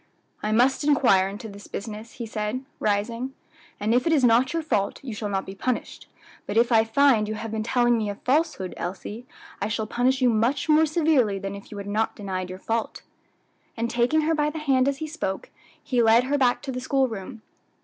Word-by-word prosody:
"I 210 - -1
must 250 +6 +3
inquire 240 -10 +4
into 210 +4 -7
this 200 -1 -11
business," 215 +2 -7
he 240 -3 -6
said, 215 +4 -3
rising, 230 +5 -1 0.4
"and 215 +2 +1
if 250 +6 +2
it 325 - +3
is 285 -4 +3
not 245 +2 +4
your 330 -1 -1
fault 200 -10 -1
you 250 -4 -5
shall 210 -1 -4
not 195 -1 -1
be 190 - -7
punished; 245 +5 -4 0.4
but 205 - -2
if 235 +1 +4
I 225 -1 +6
find 225 -1 +3
you 215 - -3
have 225 +1 -6
been 220 0 -2
telling 240 +1 +2
me 215 -2 -2
a 205 - -4
falsehood, 270 - 0
Elsie, 205 +6 -6 0.3
I 200 - 0
shall 220 0 -2
punish 250 +4 +1
you 250 -2 +4
much 235 +7 +1
more 315 +1 +5
severely 300 - +2
than 195 0 -5
if 200 0 -10
you 210 - -7
had 200 - -6
not 215 +2 -1
denied 185 -3 -4
your 185 - -6
fault." 225 +4 -3 0.7
And 235 +1 -1
taking 245 +6 +2
her 320 +1 +1
by 300 -1 +1
the 310 - -6
hand 270 -4 +2
as 280 -1 0
he 315 - -4
spoke, 295 -12 -4 0.3
he 250 -2 +1
led 230 +1 +5
her 280 +3 0
back 250 -2 +2
to 270 - -4
the 255 0 -4
school 265 0 +2
room. 220 0 -8
235 Hz, 220 wpm, -25 LUFS, 210-265 Hz, 0.7 s, I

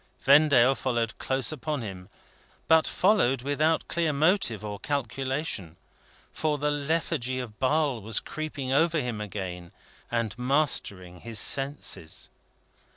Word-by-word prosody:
Vendale 140 -2 +5
followed 120 -4 -2
close 130 +1 +1
upon 150 -2 -3
him, 95 -2 -8 0.6
but 160 -1 +5
followed 170 - +2
without 155 +3 +1
clear 165 -2 0
motive 145 - +1
or 105 -1 -5
calculation. 135 - -3 0.6
For 155 -2 -1
the 150 +1 0
lethargy 145 -4 -1
of 115 -4 -8
Basle 140 -3 +1
was 110 +1 +2
creeping 145 -4 -5
over 160 +3 +3
him 120 -5 -3
again, 90 -4 -6 0.4
and 115 -3 -2
mastering 125 - 0
his 115 +2 -5
senses. 135 - 0
135 Hz, 120 wpm, -27 LUFS, 110-150 Hz, 0.6 s, Vendale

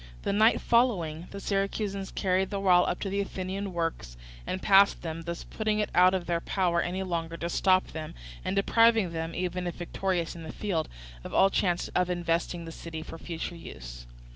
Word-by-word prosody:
The - - 0
night 220 +3 +5
following 180 -9 +1
the 200 - -7
Syracusans 195 0 -2
carried 190 0 0
their 200 - -2
wall 180 -2 +5
up 180 - -2
to 195 - -2
the 200 - 0
Athenian 195 0 -4
works 165 - -3 0.3
and 185 - -2
passed 200 +1 +5
them, 165 0 -4
thus 170 0 -5
putting 215 -1 -1
it 210 -1 -1
out 185 +1 +6
of 180 -2 -2
their 170 -1 0
power 175 -3 +1
any 185 +2 -2
longer 165 -2 -3
to 170 - -3
stop 185 +1 +3
them, 155 -1 -6 0.3
and - - -2
depriving 225 -1 +4
them, 165 0 -4
even 180 0 -2
if 175 - -4
victorious 175 -1 -2
in 170 - -8
the 160 -1 -7
field, 180 -7 -2 0.3
of - - -6
all 195 0 +5
chance 175 -2 +1
of 180 0 +1
investing 170 -1 -1
the 165 - -7
city 160 -1 -7
for 165 - -9
the - - -18
future. 170 0 -5
180 Hz, 195 wpm, -28 LUFS, 170-195 Hz, 0.3 s, out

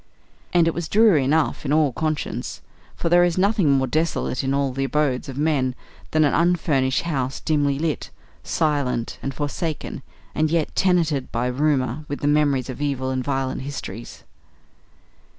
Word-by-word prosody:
And 170 -2 +4
it 165 - +1
was 170 -2 -4
dreary 205 -9 +5
enough 150 +4 +1
in 140 - -2
all 150 -3 +3
conscience, 155 +1 -3 0.3
for - - -3
there 175 +1 +5
is 175 -1 +1
nothing 195 -4 +3
more 135 -1 +2
desolate 155 -1 -1
in 135 - 0
all 140 -1 0
the 135 +1 -2
abodes 135 -1 0
of 135 - -7
men 140 -4 +1 0.3
than 155 0 +3
an 145 - +2
unfurnished 155 -6 +2
house 135 -6 -2
dimly 145 -3 +1
lit, 155 0 -2 0.3
silent, 140 -7 -1
and 135 - -3
forsaken, 145 +2 -4 0.3
and 155 0 +1
yet 165 -1 0
tenanted 165 -8 +1
by 120 +1 -1
rumour 135 +1 0
with 145 - -5
the 145 - 0
memories 145 -4 +2
of 130 +1 -7
evil 135 -2 -1
and 130 -1 -1
violent 135 -1 -2
histories. 125 -5 -7
145 Hz, 165 wpm, -23 LUFS, 130-160 Hz, 0.3 s, dreary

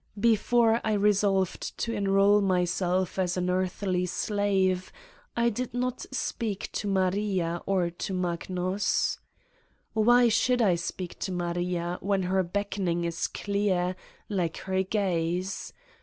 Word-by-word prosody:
Before 230 +1 +3
I 220 - +1
resolved 200 -2 +1
to 230 - -2
enroll 200 0 +4
myself 180 0 0
as 180 -1 0
an 180 0 0
earthly 185 0 0
slave 190 -2 0 0.5
I 235 0 +3
did 245 +2 -4
not 250 0 -2
speak 225 -5 -3
to 205 - -3
Maria 190 -3 0
or 185 -3 +1
to 175 +4 -5
Magnus.... 180 +2 -1 0.7
Why 240 +2 +5
should 245 +2 +2
I 205 -6 +4
speak 175 +1 -4
to 190 - -3
Maria 175 0 -2
when 195 0 +1
her 190 +1 +2
beckoning 185 -2 -1
is 170 0 -1
clear, 195 -3 0 0.3
like 180 -5 -1
her 190 0 +1
gaze? 185 -2 -1
190 Hz, 125 wpm, -28 LUFS, 180-205 Hz, 0.7 s, Why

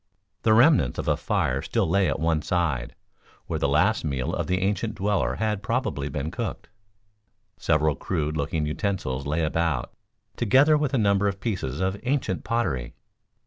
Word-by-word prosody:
The 110 -1 +4
remnants 130 - +4
of - - -4
a - - +3
fire - - 0
still - - 0
lay 95 +1 +2
at 70 - -2
one 80 -1 +1
side, 75 -9 -1 0.5
where - - -3
the - - +1
last - - +2
meal 70 +3 -2
of 85 -3 -2
the 90 - +1
ancient 105 +3 -1
dweller 100 0 0
had 105 -2 -1
probably 115 - -2
been 75 +2 -3
cooked. - - -5 0.9
Several 75 0 +2
crude 75 +3 -2
looking 75 +1 -1
utensils 75 - -2
lay 80 +3 0
about, 80 -2 -1 0.4
together 135 +7 +5
with 150 -2 0
a - - +3
number 100 -2 +2
of 100 -1 -2
pieces 90 - -3
of 95 +2 -1
ancient 125 -8 -1
pottery. 80 - -2
90 Hz, 165 wpm, -25 LUFS, 75-110 Hz, 0.9 s, together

